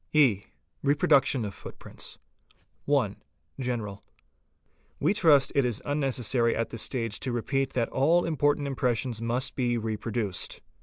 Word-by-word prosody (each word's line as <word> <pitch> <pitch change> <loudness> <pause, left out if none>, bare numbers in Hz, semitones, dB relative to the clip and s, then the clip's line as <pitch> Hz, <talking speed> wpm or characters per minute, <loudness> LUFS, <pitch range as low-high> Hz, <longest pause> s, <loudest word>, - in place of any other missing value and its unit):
E. 125 -10 +4 0.4
Reproduction 140 -3 +3
of 100 - -5
Footprints. - - -9 0.7
1. 130 -9 +1 0.4
GENERAL. 115 -6 -3
h - - -39 0.8
We - - +2
trust 155 -9 +4
it 140 - +3
is 120 -3 -1
unnecessary 130 -4 +1
at 115 - -2
this 115 - -1
stage 115 -5 -1
to 130 - -2
repeat 135 +3 -1
that 120 -2 +1
all 165 +6 +3
important 145 -2 +1
mpressions 125 -3 -1
must 120 +3 -1
be 120 -2 0
reproduced. 110 -3 -3
125 Hz, 135 wpm, -28 LUFS, 115-140 Hz, 0.8 s, E